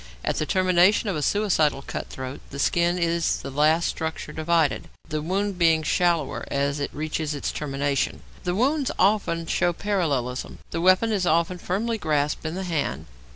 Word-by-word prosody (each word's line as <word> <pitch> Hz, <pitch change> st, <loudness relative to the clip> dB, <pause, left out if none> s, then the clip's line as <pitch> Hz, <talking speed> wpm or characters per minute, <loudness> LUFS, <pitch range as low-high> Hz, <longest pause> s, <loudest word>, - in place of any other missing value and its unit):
At -, -, 0 dB
the 155 Hz, -, -1 dB
termination 185 Hz, +3 st, +3 dB
of 190 Hz, -, -1 dB
a 150 Hz, -, -2 dB
suicidal 155 Hz, -6 st, +1 dB
cut -, -, -5 dB
throat 130 Hz, +1 st, -7 dB
the 140 Hz, -, -8 dB
skin 170 Hz, +5 st, +2 dB
is 170 Hz, -1 st, +1 dB
the 135 Hz, -, -5 dB
last 155 Hz, +4 st, +3 dB
structure 160 Hz, -1 st, -4 dB
divided, 160 Hz, -1 st, +1 dB, 0.2 s
the 155 Hz, -1 st, -2 dB
wound 190 Hz, +3 st, -1 dB
being 165 Hz, -2 st, +4 dB
shallower 170 Hz, -2 st, +1 dB
as 140 Hz, +1 st, 0 dB
it 145 Hz, -, -2 dB
reaches 155 Hz, 0 st, -3 dB
its 145 Hz, -, -2 dB
termination; 140 Hz, -1 st, -2 dB, 0.2 s
the 180 Hz, 0 st, -1 dB
wounds 275 Hz, +5 st, +1 dB
often 190 Hz, -5 st, +2 dB
show 175 Hz, +1 st, +1 dB
parallelism. 150 Hz, -11 st, -2 dB
The 165 Hz, -, -2 dB
weapon 185 Hz, +5 st, +4 dB
is 195 Hz, -4 st, 0 dB
often 170 Hz, +2 st, +1 dB
firmly 220 Hz, +6 st, -2 dB
grasped 150 Hz, -1 st, 0 dB
in 160 Hz, -, -4 dB
the 190 Hz, -, -3 dB
hand. 165 Hz, -5 st, -2 dB
165 Hz, 170 wpm, -25 LUFS, 150-185 Hz, 0.2 s, being